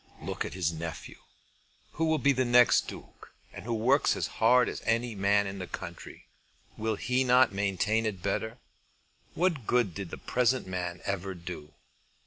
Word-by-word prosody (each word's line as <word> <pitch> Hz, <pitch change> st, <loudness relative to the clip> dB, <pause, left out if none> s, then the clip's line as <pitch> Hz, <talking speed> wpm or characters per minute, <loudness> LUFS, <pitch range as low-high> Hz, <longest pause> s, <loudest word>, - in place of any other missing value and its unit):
"Look -, -, -4 dB
at -, -, -6 dB
his 85 Hz, -3 st, 0 dB
nephew, 80 Hz, 0 st, -7 dB, 0.7 s
who 165 Hz, -, -1 dB
will 160 Hz, 0 st, +2 dB
be 140 Hz, 0 st, +3 dB
the 130 Hz, -1 st, +1 dB
next 120 Hz, 0 st, +5 dB
Duke, -, -, -11 dB, 0.2 s
and -, -, -9 dB
who 120 Hz, -, -2 dB
works 130 Hz, +6 st, +3 dB
as -, -, -1 dB, 0.2 s
hard 125 Hz, +3 st, +5 dB
as -, -, -5 dB
any 115 Hz, +1 st, 0 dB
man 100 Hz, 0 st, +2 dB
in 95 Hz, 0 st, -5 dB
the 90 Hz, -, -5 dB
country. 85 Hz, -2 st, -9 dB, 0.5 s
Will 110 Hz, 0 st, -1 dB
he 125 Hz, +5 st, 0 dB
not 125 Hz, -2 st, +4 dB
maintain 100 Hz, +3 st, 0 dB
it 95 Hz, -4 st, -5 dB
better? 110 Hz, +4 st, -2 dB, 0.8 s
What 165 Hz, -, 0 dB
good 120 Hz, -7 st, +2 dB
did 100 Hz, -1 st, -6 dB
the -, -, -7 dB
present 125 Hz, +1 st, +1 dB
man 90 Hz, -1 st, -4 dB
ever 95 Hz, -1 st, -3 dB
do?" 85 Hz, -3 st, -9 dB
110 Hz, 170 wpm, -29 LUFS, 95-125 Hz, 0.8 s, next